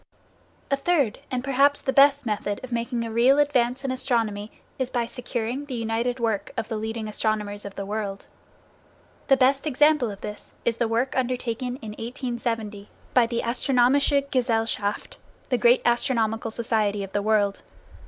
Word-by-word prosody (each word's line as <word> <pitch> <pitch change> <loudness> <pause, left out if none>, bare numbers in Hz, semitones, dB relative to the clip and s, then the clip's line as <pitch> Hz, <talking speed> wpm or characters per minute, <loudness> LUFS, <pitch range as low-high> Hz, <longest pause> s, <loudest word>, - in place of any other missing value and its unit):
A - - +5
third, 275 -5 +1
and 255 -1 -2
perhaps 275 +1 +3
the 265 - -2
best, 280 0 +5
method 205 -2 -2
of 255 - -8
making 235 0 -1
a 225 - -5
real 245 +5 +4
advance 265 -3 +2
in 265 - 0
astronomy 225 -5 -1 0.3
is 260 -1 0
by 240 -2 0
securing 245 +2 -4
the 270 -3 -5
united 230 +2 -1
work 225 -4 -1
of 225 -1 -3
the 225 - -2
leading 220 0 -4
astronomers 210 -1 -2
of 200 - -8
the 200 - -4
world. 200 -1 -4 1.0
The 270 - +5
best 270 +3 +3
example 295 -2 +3
of 200 -1 -8
this 210 - -8
is 230 -1 +1
the 235 - +1
work 235 +4 0
undertaken 250 -1 -2
in 215 - -5
1870 230 -3 -4 0.2
by 245 -2 +5
the 235 0 -2
Astronomische 270 +3 +2
Gesellschaft, 225 -5 -1 0.3
the 250 -2 +1
great 240 +3 +5
astronomical 230 -2 +1
society 220 -3 0
of 195 - -8
the 205 - +1
world. 205 -1 +1
235 Hz, 165 wpm, -25 LUFS, 220-260 Hz, 1.0 s, A